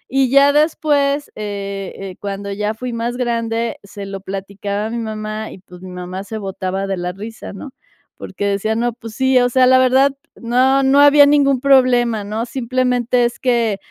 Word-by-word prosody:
y 270 -2 +3
ya 280 +1 +6
después, 295 -2 +1
eh 200 -2 -5
eh, 195 -2 -7
cuando 200 0 -5
ya 210 +2 -2
fui 250 +2 -5
más 235 +1 -3
grande, 230 -1 -2
se 200 0 -9
lo 195 0 -6
platicaba 200 +2 -4
a - - -6
mi 235 - -3
mamá 215 -1 -5
y - - -11
pues 180 -1 -15
mi 185 - -9
mamá 180 +1 -6
se 220 +1 -6
botaba 195 -1 -4
de 195 - -2
la 180 0 -4
risa 215 +3 -9
¿no? 200 +8 -8 0.5
Porque 205 - -5
decía, 200 +2 -1
no, 240 +2 0
pues 225 -2 -11
sí 260 0 +3
o 245 0 +2
sea, 255 +1 +4
la 260 0 +6
verdad 260 +2 +4 0.2
no 260 +3 +2
no 270 +1 +4
había 290 0 +7
ningún 275 -3 +3
problema 245 -5 +3
¿no? 215 +3 -3
Simplemente 250 -1 0
es 240 - -3
que 235 -5 +1
230 Hz, 190 wpm, -18 LUFS, 200-255 Hz, 0.5 s, había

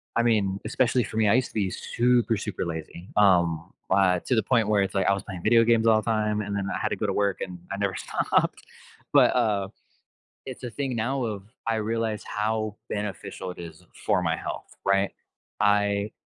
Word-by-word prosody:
I 115 - +4
mean, 100 -4 +1
especially 125 +1 +2
for 110 - -7
me, 110 -2 +3
I - - +5
used 130 0 +2
to - - -20
be 100 -4 0
super, 120 -1 +1
super 105 -3 -4
lazy, 85 +2 -6
um, 85 -4 +3 0.2
uh, 90 -2 +4
to 125 - +1
the 110 - +2
point 115 -1 +2
where 105 -1 +3
it's 95 - -1
like 95 -1 +1
I - - +5
was 100 - -3
playing 90 -2 -7
video 115 +1 +5
games 115 0 +3
all 110 -1 +5
the - - -15
time, 105 -1 +1
and 100 -1 -4
then 100 -1 -2
I - - -1
had - - 0
to - - -1
go - - -1
to - - 0
work, 100 -2 0
and 90 -1 -5
I 100 - -2
never 100 -1 -1
stopped. - - 0 0.5
But, - - +6
uh, 100 -3 +1 0.8
it's 130 -1 -8
a 120 - -4
thing 135 +1 -3
now 125 +4 -1
of, 105 -4 -4 0.2
I 115 -1 +1
realize 110 0 -1
how 110 0 -2
beneficial 100 -2 -5
it 90 - -10
is 85 -2 -10 0.2
for - - +3
my - - 0
health, - - -7
right? 100 0 +3 0.5
I 105 0 +2
105 Hz, 215 wpm, -26 LUFS, 95-115 Hz, 0.8 s, But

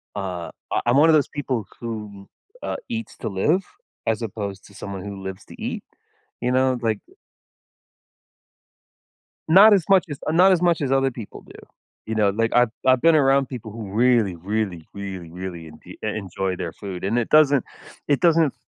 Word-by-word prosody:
uh, 90 -4 -4 0.2
I - - +2
I'm 120 +2 +3
one 155 +3 +6
of - - +6
those 150 - +3
people 130 -7 -3
who, 105 -4 -7 0.4
uh, - - -2
eats 230 -1 -5
to - - -4
live 150 - +1 0.4
as 115 0 0
opposed 100 -3 -5
to 100 - -18
someone 100 -2 -7
who 100 -1 -7
lives 95 0 -7
to - - -14
eat, - - -4 0.6
you 125 +1 0
know, 130 0 +2
like 110 -3 0 2.5
Not 195 +7 +8
as 195 -4 +3
much 195 -1 +5
as 145 -1 -6
uh, - - +1
not 185 +4 +6
as 180 -2 +3
much 170 -3 +2
as 135 - -1
other 135 0 +2
people 115 -4 -9
do, - - -14 0.5
you 110 - -3
know? 105 -2 +3
Like, 115 +3 0
I've 120 -1 +4 0.2
I've 130 -1 +4
been 165 -1 +5
around 135 -2 +4
people 120 -4 -7
who 105 -3 -7
really, 115 -3 +3
really, 95 -2 -3
really, 95 -4 -7
really 85 -3 -7
enpe 75 - -18
e - - -16
enjoy 95 -3 -3
their 85 -2 -5
food, 95 -3 -7
and 105 +5 0
it 120 - 0
doesn't 145 -4 +5 0.4
it 145 -2 +2
doesn't 165 -4 +3
115 Hz, 185 wpm, -23 LUFS, 100-140 Hz, 2.5 s, Not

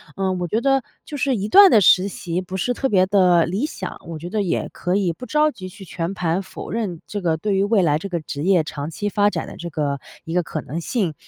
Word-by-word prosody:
呃， 190 -1 0
我 180 -1 -2
觉 220 +6 0
得 270 -1 +2 0.2
就 295 - -6
是 265 -1 +1
一 205 0 -2
段 395 - +8
的 215 - +7
实 185 +1 +5
习 180 -2 -4
不 185 +1 -6
是 245 +7 0
特 270 +2 -1
别 185 -4 +4
的 180 -4 +4
理 195 - -1
想， 190 - -6
我 165 -2 -6
觉 175 +3 -7
得 210 +1 -1
也 185 - -1
可 180 +2 -2
以 190 -4 +1
不 250 - -9
着 300 +2 +2
急 185 -8 -9
去 190 +1 -12
全 170 +2 -4
盘 180 0 -1
否 - - -9
认 200 -7 -3
这 205 - -4
个 165 -3 +1
对 200 +3 -1
于 195 - +2
未 205 -1 +3
来 150 -3 +2
这 200 - -6
个 175 -2 -2
职 145 -1 -5
业 180 -3 +3
长 145 0 -5
期 205 +5 -4
发 205 0 +3
展 - - -4
的 - - -9
这 170 - -6
个 145 -3 -2 0.3
一 165 - -5
个 180 0 +2
可 155 -1 -5
能 165 +5 -5
性。 190 -5 -1
185 Hz, 285 characters per minute, -21 LUFS, 170-210 Hz, 0.3 s, 段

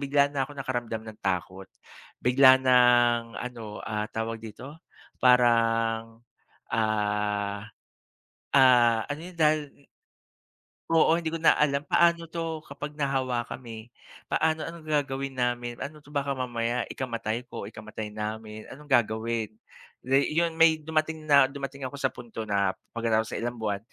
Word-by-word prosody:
bigla 140 0 +2
na 135 -1 -1
akong 145 - -12
nakaramdam 120 -4 -3
ng 110 -1 -11
takot 95 +1 -2 0.6
bigla 130 +1 +7
ng 120 -2 +4
ano, 115 -4 -7
ah, 105 -1 -2
tawag 110 0 -3
dito, 130 +8 -10 0.4
parang, 115 -2 +3 0.5
ah, 105 -2 -1 0.9
ah, 120 -4 +6
ano 145 +1 -4
yun - - -18
dahil 150 -2 0 1.0
Oo. 165 0 +5
Hindi 165 -2 -2
ko 165 - -3
na 160 - +5
alam, 145 0 +1
paano 170 -1 +3
'to 165 -1 -4
kapag 145 +1 -7
nahawa 130 -4 -1
kami? 115 -2 -8 0.4
Paano 160 0 0
anong 165 -1 -9
gagawin 140 -3 -1
namin? 120 -1 -2
Ano 150 0 -7
'to, 145 - -17
baka 140 -1 -1
mamaya 120 -1 -2
ikamatay 115 -1 -4
ko, - - -7
ikamatay 110 0 -7
namin, 110 0 -6
anong 150 +1 -13
gagawin? 115 -1 +1 0.6
Day 135 +4 +2
iyon 165 -1 +1
may 165 -1 +7
dumating 155 0 -2
na 140 -3 +6
dumating 135 0 -6
ako 140 - -9
sa 140 - -1
punto 115 -2 -8
na 100 -2 0 0.2
pagkatapos 110 -1 0
ng - - -3
ilang 120 - -4
buwan, 105 -3 -2
125 Hz, 140 wpm, -27 LUFS, 110-145 Hz, 1.0 s, bigla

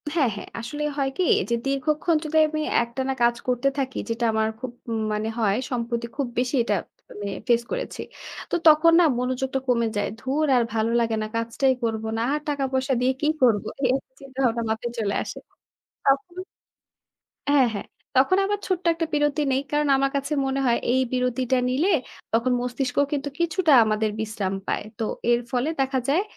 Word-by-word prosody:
হ্যাঁ, 275 -8 +3
হ্যাঁ। - - -8
আসলে 295 +6 -5
হয় 270 -1 +1
কী? 370 - +2 0.3
যে, - - +1
দীর্ঘক্ষণ 300 +4 +1
যদি 315 +1 0
আমি 310 0 -3 0.2
একটানা 260 +3 -3
কাজ 235 0 +4
করতে 250 +2 +1
থাকি, 265 -1 -2
যেটা 230 +1 -1
আমার 220 0 +2
খুব 255 -2 -5 0.2
ম - - -3 0.2
মানে 215 +1 -1
হয়, 205 -2 +2 0.2
সম্প্রতি 235 -1 -2
খুব 275 -3 0
বেশি 255 +2 0
এটা 210 -3 +1 0.4
আমি 205 -1 -6 0.2
ফেস 235 -1 +4
করেছি। - - -4 0.5
তো - - +2
তখন 310 +2 +7
না? - - +6 0.2
মনোযোগটা 260 +1 -1
কমে 235 -2 +2
যায়। 205 - 0
"ধুর 285 +5 0
আর 240 - +4
ভালো 220 0 +1
লাগে 225 -1 +1
না, 215 - -2
কাজটাই 230 +4 +1
করব 225 -1 -1
না, - - -1
আর 300 - 0
টাকা 285 -2 -1
পয়সা 265 +1 +1
দিয়ে 255 - +3
কী 300 - +2
করব?" 225 -5 +4 0.2
এই, 255 - +5
এই 270 - +1 0.2
চিন্তাভাবনা 260 -4 -1
মাথায় 225 +2 -2
চলে 200 -2 0
আসে। - - -7 0.7
তখন 275 +6 +1 1.1
হ্যাঁ, 275 -4 +5
হ্যাঁ। 200 - -5 0.3
তখন 275 +9 +4
আমার 410 0 -1
ছোট্ট 370 -2 -1
একটা 330 0 -2
বিরতি 295 0 +2
নেই। 265 - +2
কারণ 295 0 +1
আমার 275 0 +1
কাছে 280 +2 -1
মনে 270 +1 -1
হয়, 235 -1 +3 0.2
এই 260 - +3
বিরতিটা 250 0 +1
নিলে 315 +10 +2 0.4
তখন 235 +3 +2
মস্তিষ্কও 250 +2 0
কিন্তু 285 0 -2
কিছুটা 335 -1 +2
আমাদের 215 0 +1
বিশ্রাম 210 -3 -2
পায়। - - -1
তো 225 - 0 0.3
এর 235 - +4
ফলে 255 +4 0
দেখা 265 0 +1
যায় 340 +8 +3
260 Hz, 185 wpm, -24 LUFS, 235-285 Hz, 1.1 s, তখন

